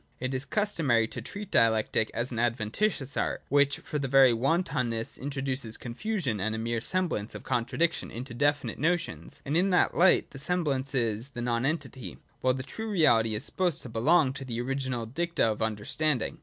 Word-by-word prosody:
(2) 130 - -5
It 130 - -2
is 130 +2 -2
customary 155 - +1
to - - -7
treat 205 -1 -8
Dialectic 110 -1 +3
as 120 +2 -2
an 115 - -3
adven 115 -2 0
titious 155 - 0
art, - - -3
which 145 0 +3
for 150 - -4
very 135 -2 +5
wantonness 130 -4 0
introduces 135 -4 -3
con 120 - -7
fusion 170 - -2
and 110 +3 -1
a - - -3
mere 115 0 -2
semblance 170 - -1
of - - -7
contradiction 160 +8 0
into 120 +1 -7
definite 145 +4 0
notions. 170 +1 -2
And 145 +2 -1
in 185 +3 +3
that 180 - +3
light, 185 +2 +4
the 135 - -8
semblance 140 -4 -1
is 115 0 0
the 120 -3 -6
nonentity, 125 - -2 0.2
while 130 0 +2
the 130 - -4
true 220 +12 -6
reality 115 - +3
is 105 - -2
supposed 180 -3 -1
to 125 - -8
be 115 - -4
long 145 +1 +4
to 135 - -7
the 120 -3 -4
original 130 -2 -2
dicta 170 +9 -1
of 110 -1 -1
understanding. 110 +5 -1
130 Hz, 190 wpm, -28 LUFS, 115-155 Hz, 0.2 s, very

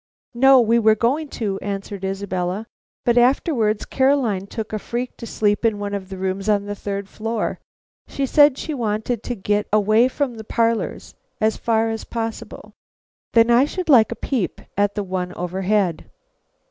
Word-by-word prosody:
"No, 270 +2 +6
we 235 0 +3
were 220 -1 +4
going 265 +8 0
to," 205 -7 -3
answered 200 -1 -5
Isabella, 190 0 -3 0.4
"but 240 0 +4
afterwards 240 -4 +2
Caroline 260 -8 +1
took 220 +1 -6
a 215 - -1
freak 240 +4 -4
to 230 - -8
sleep 205 -1 0
in 225 -2 +2
one 205 0 -4
of 195 -2 -5
the 190 - -7
rooms 190 +2 -2
on 205 -1 +2
the 205 - -4
third 200 -1 -5
floor. 225 +2 -3 0.5
She 275 - -2
said 290 0 +5
she 315 - -4
wanted 220 -2 -2
to 245 - -4
get 205 0 -1
away 215 +3 +4
from 260 -2 -2
the 220 - -7
parlors 230 +1 -1 0.3
as 220 0 +2
far 225 -1 +1
as 225 - -4
possible." 225 -1 -6 0.6
"Then 230 0 +5
I 240 +3 +5
should 360 +3 -5
like 235 -6 +6
a - - -3
peep 245 -10 -2 0.2
at 205 0 +1
the 205 - -1
one 180 -1 -3
overhead." 185 0 -1
220 Hz, 170 wpm, -21 LUFS, 200-240 Hz, 0.6 s, No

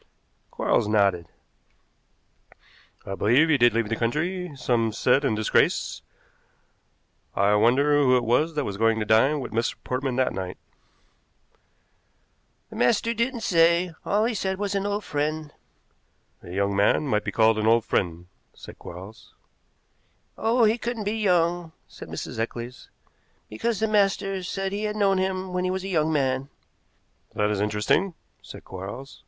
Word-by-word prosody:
Quarles - - 0
nodded. 100 -5 +2 1.8
"I 95 - -5
believe 125 +11 +3
he 150 - +4
did 120 -1 +4
leave 115 -2 +1
the 115 - 0
country; 170 +10 -2
some 120 -3 0
said 125 +5 +2
in 135 -6 +1
disgrace. 110 0 +1 1.3
I 100 +1 +3
wonder 125 +8 +3
who 130 -2 +4
it 125 - -1
was 150 +8 +1
that 150 - -1
was 100 -1 -4
going 115 +1 +2
to 110 - -2
dine 135 +8 +3
with 125 - -6
Mr. 115 +2 -1
Portman 130 0 -2
that 130 0 +1
night." 95 -1 -5 2.1
"The - - -8
master 230 - +2
didn't 235 +1 -2
say. 170 -1 +3
All 210 +2 +1
he 240 - 0
said 190 -2 -2
was 205 0 -2
an 200 0 -1
old 205 +1 -2
friend." 150 0 -3 0.9
"A - - -12
young 100 +2 -1
man 100 +9 +2
might 105 -6 0
be - - -3
called 110 -1 +3
an 110 - 0
old 115 0 +4
friend," 85 -1 -1 0.3
said - - -12
Quarles. 95 +6 -11 1.0
"Oh, 230 +2 +2
he 220 +2 +3
couldn't 235 -2 -3
be 205 +2 -2
young," 175 -4 +1
said - - -11
Mrs. - - -6
Eccles, 120 +2 -5 0.6
"because 210 - -2
the 220 - +1
master 195 -2 +1
said 195 +1 -3
he 205 +2 -3
had 210 0 -2
known 195 -2 +2
him 185 0 -2
when 180 0 -1
he 185 - 0
was 190 0 -2
a - - -5
young 160 -3 +1
man." 135 -2 0 0.9
"That 105 0 +1
is 100 -1 -1
interesting," 105 - 0 0.3
said - - -11
Quarles. 100 +9 -8
140 Hz, 160 wpm, -25 LUFS, -, 2.1 s, he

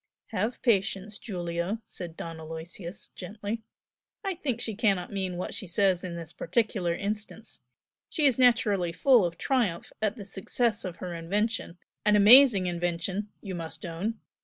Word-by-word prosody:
"Have 220 +3 -2
patience, 205 -2 +1
Giulio!" 175 -1 -3
said 170 -6 -8
Don 165 -1 -6
Aloysius, 165 +3 -8
gently 205 +4 -5 0.6
"I 390 -1 -1
think 275 -9 -2
she 225 - 0
cannot 195 -4 +1
mean 190 -2 -2
what 180 - -4
she 195 - -4
says 185 +1 +2
in 180 -2 -4
this 165 -1 -7
particular 180 -2 0
instance. 210 +3 -5 0.5
She 305 - +1
is 260 -3 +4
naturally 205 -8 +3
full 250 +3 +5
of 170 -1 -3
triumph 235 -11 0
at 215 0 +1
the 205 -5 -8
success 210 +3 0
of 180 -2 -4
her 180 0 -6
invention, 195 +2 -1 0.3
an 210 0 +4
amazing 210 -1 +8
invention 175 +3 -2
you 195 - -5
must 165 -1 -6
own! 180 +7 -3
195 Hz, 155 wpm, -28 LUFS, 175-220 Hz, 0.6 s, amazing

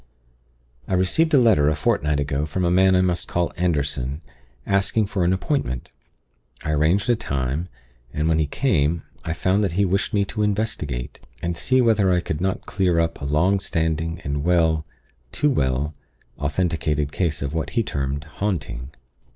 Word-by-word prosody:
"I 95 - 0
received 125 - +2
a 145 - +6
letter 105 - +5
a 75 - +1
fortnight 75 0 +1
ago 70 +1 -1
from 90 +4 -1
a 85 - +2
man 95 +1 +5
I 90 - +4
must 90 -1 0
call 85 -1 -1
Anderson, 70 -4 -1 0.4
asking 100 +2 +2
for 100 -2 -1
an 85 - +3
appointment. 95 - -2 0.7
I 75 - -1
arranged 80 +8 +2
a 120 - +4
time, 70 - -2 0.4
and 75 +4 -1
when 80 -1 +2
he 75 - +1
came, 80 - +1 0.2
I 80 - -2
found 95 +5 +1
that 95 -4 0
he 100 +3 +2
wished 95 +4 0
me 100 -2 +2
to 105 - -4
investigate 105 - -2 0.2
and 85 0 -1
see 130 +9 +2
whether 110 -5 +3
I 90 - +3
could 80 -2 -4
not 95 0 -1
clear 90 -5 +1
up 85 -2 -1
a - - -3
long 85 +8 +2
standing 80 -1 -1
and 70 0 -3
well 80 -3 +2 0.4
too 150 - +2
well 70 - 0 0.5
authenticated 75 -1 0
case 80 -7 -1
of 70 +1 -3
what 80 - -2
he 115 - +4
termed 70 -4 -3
'haunting.' 75 -8 -3
85 Hz, 175 wpm, -23 LUFS, 75-95 Hz, 0.7 s, a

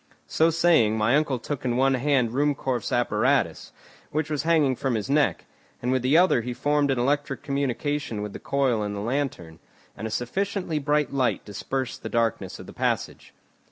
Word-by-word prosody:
So 160 +1 +2
saying, 160 -10 +3
my 110 +4 +3
uncle 145 -3 +1
took 135 +4 -5
in 120 -1 0
one 135 +1 +3
hand 130 -2 +1
Ruhmkorff's 135 -3 -1
apparatus, - - +1 0.4
which 155 +1 -2
was 150 - 0
hanging 155 -5 +3
from 130 -1 -1
his 110 +5 -3
neck; 145 -1 +2 0.3
and 125 - -1
with 130 -1 +1
the 130 +5 +3
other 180 -8 +4
he 120 +1 -5
formed 145 +2 +1
an 135 - +1
electric 135 +1 -1
communication 140 -4 -2
with 105 - -6
the - - -7
coil 135 -5 0
in 105 -1 -3
the - - -4
lantern, 115 - -3 0.4
and 110 - -5
a - - -5
sufficiently 170 - -2
bright 150 0 0
light 130 -3 0
dispersed 130 +5 -4
the 110 - -5
darkness 115 -1 -1
of - - -10
the - - -11
passage. - - -2
135 Hz, 185 wpm, -25 LUFS, 120-145 Hz, 0.4 s, other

